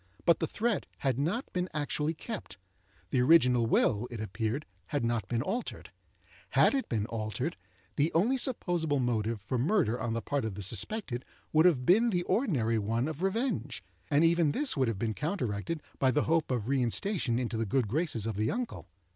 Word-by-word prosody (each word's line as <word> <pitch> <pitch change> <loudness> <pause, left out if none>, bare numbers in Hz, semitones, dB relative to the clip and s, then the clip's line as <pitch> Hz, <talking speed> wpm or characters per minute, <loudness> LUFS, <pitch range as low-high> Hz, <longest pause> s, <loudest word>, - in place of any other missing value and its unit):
But 170 - +5
the 160 - 0
threat 225 +1 -1
had 135 -2 0
not 180 - -2
been 180 0 -1
actually 150 +1 -1
kept; 220 +7 -7 0.5
the 130 - +3
original 125 -5 +5
will, 115 0 +2
it 120 - -7
appeared, 110 +6 -2 0.2
had 145 -5 -1
not 115 -4 -1
been 120 0 -1
altered. 230 +9 -4 0.7
Had - - +6
it 270 -1 -1
been 110 -3 0
altered, 110 -2 -3 0.4
the 150 +3 +2
only 210 +11 +3
supposable 175 - 0
motive 115 -3 0
for 120 +6 -2
murder 150 - +1
on 115 - -1
the 115 - -2
part 145 -1 -1
of 110 -3 -3
the 100 - -5
suspected 120 - -2 0.3
would 155 +3 +6
have 130 -8 +2
been 225 - +5
the 175 -5 0
ordinary 130 - +1
one 115 +5 0
of 155 +1 -5
revenge; 195 - -1 0.3
and 145 +3 +4
even 165 -3 +3
this 290 -1 +1
would 135 -3 +2
have 115 -3 -1
been 110 +1 -1
counteracted 150 - -3 0.2
by 130 - +4
the 145 +3 +2
hope 165 -1 +1
of 120 -4 -1
reinstation 135 - +1
into 120 -2 -2
the 110 -1 -1
good 125 +1 +1
graces 130 - -1
of 110 -3 -3
the 110 +1 +1
uncle. 245 +1 -4
140 Hz, 190 wpm, -30 LUFS, 115-175 Hz, 0.7 s, Had